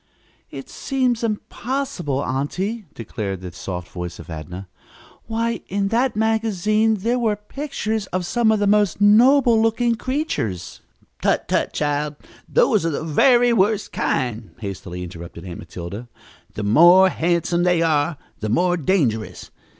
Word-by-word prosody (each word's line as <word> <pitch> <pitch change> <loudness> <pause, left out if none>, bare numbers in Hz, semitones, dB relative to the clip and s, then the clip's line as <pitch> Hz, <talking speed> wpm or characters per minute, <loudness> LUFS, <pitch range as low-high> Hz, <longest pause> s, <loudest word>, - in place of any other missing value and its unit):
"It - - -8
seems 255 -4 -1
impossible, 215 - -2
aunty," 185 - -2
declared 100 -4 -5
the 90 -1 -7
soft 90 +2 -6
voice 90 -1 -6
of - - -12
Adnah. 85 +5 -7 0.6
"Why, 230 +1 -1
in 195 +1 -1
that 240 +2 +1
magazine 220 -1 +1
were 235 -2 +1
the 205 - -25
pictures 220 -8 -3
of 185 -1 -2
some 230 +3 +2
of 220 - +3
the 205 - +1
most 205 -3 +2
noble 235 +3 +5
looking 230 +1 +2
creatures 230 - -3 0.2
" - - -34
"Tut, - - +1
tut, - - 0
child, 150 0 -1 0.3
those 225 - +3
are 165 - +1
the 155 0 -3
very 240 - +4
worst 210 0 +1
kind," 115 -4 -2
hastily 90 -4 -6
interrupted 85 0 -9
Aunt 85 -2 -7
Matilda. 90 +7 -8 0.5
"The 105 - -4
more 175 - +7
handsome 170 0 0
they 175 -1 +3
are, 150 -1 +1 0.2
the 110 - -3
more 175 +9 +2
dangerous. 135 - -1
180 Hz, 140 wpm, -21 LUFS, -, 0.6 s, more